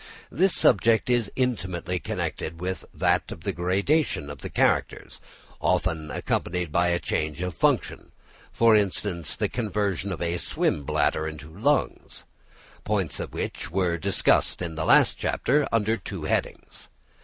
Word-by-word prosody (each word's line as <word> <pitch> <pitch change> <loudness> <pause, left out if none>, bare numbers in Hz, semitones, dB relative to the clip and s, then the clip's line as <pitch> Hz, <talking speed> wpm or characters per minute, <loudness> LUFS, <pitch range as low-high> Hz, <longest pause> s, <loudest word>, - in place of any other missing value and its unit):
This 185 +7 +2
subject 115 +2 +3
is 120 -4 +1
intimately 90 -8 -1
connected 80 0 -4
with 95 +1 -4
that - - +1
of - - -8
the 100 +3 -2
gradation 95 - 0
of 70 - -9
the - - -6
characters, - - 0 0.4
often 80 -2 0
accompanied 90 +1 -2
by 85 +3 +2
a 85 0 +2
change 75 -3 -2
of 90 -1 -3
function, 75 - 0 0.4
for 115 -1 +5
instance, 100 -4 0
the - - 0
conversion 105 -4 -2
of 90 - -4
a 85 0 -1
swim 75 -3 -1
bladder 80 +3 +1
into 75 0 -8
lungs, 140 +9 -1 0.6
points - - -1
which - - -4
were 85 -1 0
discussed - - +2
in 85 -2 -4
the 80 0 -3
last - - +5
chapter 145 +2 +1
under 115 0 +1
two 95 - -7
headings. - - -3
90 Hz, 145 wpm, -25 LUFS, 85-110 Hz, 0.6 s, for